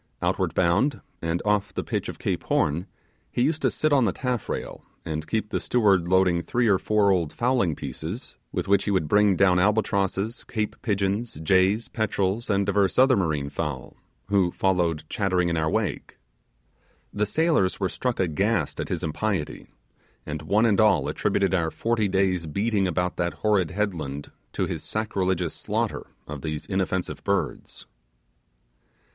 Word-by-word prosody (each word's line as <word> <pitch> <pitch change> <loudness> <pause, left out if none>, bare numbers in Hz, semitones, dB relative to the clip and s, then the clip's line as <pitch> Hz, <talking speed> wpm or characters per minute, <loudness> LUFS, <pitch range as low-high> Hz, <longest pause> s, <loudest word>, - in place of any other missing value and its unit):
Outward - - -1
bound, 95 +11 +2 0.2
and 85 +1 -1
off 105 -1 +1
the - - -2
pitch - - -3
of - - -7
Cape - - -2
Horn, 85 +7 +1 0.4
he 120 - +1
used 155 +3 0
to - - +3
sit 155 -1 0
on 135 -4 +4
the 100 - +2
taffrail, 125 +1 -4 0.2
and 80 -1 -4
keep 110 +4 -1
the - - -1
steward 100 -8 +2
loading 90 -1 +3
three 120 +6 0
or 100 -3 +4
four 105 -2 +2
old 85 -5 +1
fowling 120 - +1
pieces, 90 +10 -6 0.2
with - - -3
which 100 0 +3
he - - -1
would 95 -6 +1
bring 105 +3 +4
down 90 -1 +4
albatrosses, 100 +1 0
Cape 110 -3 -3
pigeons, 100 +2 -1
jays, 95 +6 +3
petrels, 110 0 -1
and 100 -1 +2
divers 100 -2 +1
other 130 0 +6
marine 75 -7 -1
fowl, 75 -4 -4 0.3
who 100 -3 +3
followed 85 -5 0
chattering 90 -3 0
in 85 - 0
our 80 -1 +1
wake. - - -2 1.0
The 105 0 0
sailors 155 - +1
were 95 - +1
struck 125 +6 -2
aghast 95 +5 0
at - - -3
his - - -2
impiety, 85 0 -2 0.6
and 75 0 -5
one 100 +8 +2
and 110 -2 +3
all 95 -10 +4
attributed 95 -1 0
our 85 -3 +1
forty 115 +3 0
days' 95 -3 +1
beating 100 +4 0
about 90 0 -1
that 85 0 -1
horrid 100 -6 +3
headland 80 -7 -3 0.2
to - - 0
his - - -4
sacrilegious 95 -6 -1
slaughter - - -2 0.2
of 75 -2 -6
these 75 0 -4
inoffensive 95 -1 -2
birds. - - -2
95 Hz, 160 wpm, -25 LUFS, 85-105 Hz, 1.0 s, other